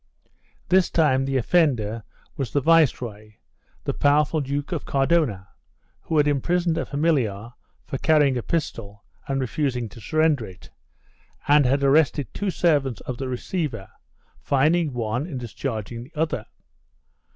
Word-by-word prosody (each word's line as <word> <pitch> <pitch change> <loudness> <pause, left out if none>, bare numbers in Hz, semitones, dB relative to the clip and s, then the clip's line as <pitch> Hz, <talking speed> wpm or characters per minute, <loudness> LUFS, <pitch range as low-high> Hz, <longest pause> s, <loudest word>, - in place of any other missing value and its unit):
This 185 0 +4
time 135 -5 +2
the 135 0 0
offender 120 -7 +1 0.3
was 135 -4 -4
the 145 - +2
viceroy, 125 -9 +1 0.5
the - - -2
powerful 150 +2 +2
Duke 140 +3 -3
of 165 -5 -2
Cardona, 135 - 0 0.5
who 160 - -2
had 150 -1 +4
imprisoned 170 +4 +1
a - - -3
familiar 125 -8 0 0.3
for 135 - -5
carrying 150 -4 +3
a 120 - -1
pistol 110 -10 -4 0.2
and 135 0 -1
refusing 130 -1 -1
to 105 +3 -13
surrender 155 -1 +1
it, 90 -1 -14 0.8
and 145 -2 +5
had 140 +2 +1
arrested 145 0 +2
two 205 - -2
servants 145 - +1
of 125 -2 -6
the 135 - -3
receiver, 125 - -4 0.5
fining 155 +3 +2
one 125 +4 -2
and 140 -8 -5
discharging 120 -1 -5
the 145 - -20
other. 155 +1 -1
140 Hz, 140 wpm, -24 LUFS, 120-155 Hz, 0.8 s, and